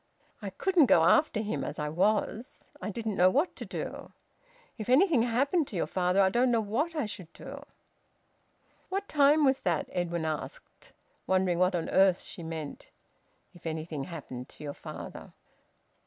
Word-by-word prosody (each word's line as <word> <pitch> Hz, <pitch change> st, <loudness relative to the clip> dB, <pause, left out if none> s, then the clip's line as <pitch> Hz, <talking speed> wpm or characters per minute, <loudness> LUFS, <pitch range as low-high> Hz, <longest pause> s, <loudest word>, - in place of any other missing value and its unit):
I 200 Hz, -, -4 dB
couldn't 335 Hz, -, +3 dB
go 165 Hz, -, +5 dB
after 215 Hz, -, +4 dB
him, 205 Hz, -11 st, -3 dB
as -, -, -5 dB
I 150 Hz, -, -2 dB
was. 210 Hz, +8 st, -1 dB
I -, -, -3 dB
didn't 220 Hz, -1 st, -3 dB
know 180 Hz, +1 st, +6 dB
what 285 Hz, -, +1 dB
to -, -, -6 dB
do. -, -, -6 dB, 0.6 s
If 220 Hz, -1 st, -6 dB
anything 295 Hz, 0 st, +5 dB
happened 275 Hz, +7 st, +1 dB
to -, -, -9 dB
your 175 Hz, -, 0 dB
father, 180 Hz, +1 st, +1 dB
I 190 Hz, -, +4 dB
don't 245 Hz, +5 st, +2 dB
know 235 Hz, -1 st, +3 dB
what 245 Hz, +11 st, -1 dB
I 300 Hz, -, 0 dB
should 185 Hz, -5 st, -8 dB
do." 280 Hz, +1 st, -9 dB, 1.3 s
"What 395 Hz, +1 st, -2 dB
time 295 Hz, +1 st, +4 dB
was 265 Hz, 0 st, +3 dB
that?" 170 Hz, -4 st, -1 dB
Edwin 170 Hz, -2 st, -2 dB
asked, 155 Hz, -1 st, -6 dB, 0.4 s
wondering 185 Hz, -2 st, +2 dB
what 185 Hz, 0 st, +3 dB
on 170 Hz, -, -2 dB
earth 190 Hz, -1 st, +4 dB
she -, -, -8 dB
meant 160 Hz, -3 st, -7 dB, 0.6 s
"if 175 Hz, -2 st, -10 dB
anything 155 Hz, -3 st, -4 dB
happened 135 Hz, -7 st, -8 dB
to -, -, -13 dB
your 145 Hz, -1 st, -4 dB
father!" -, -, -9 dB
195 Hz, 170 wpm, -29 LUFS, 170-260 Hz, 1.3 s, know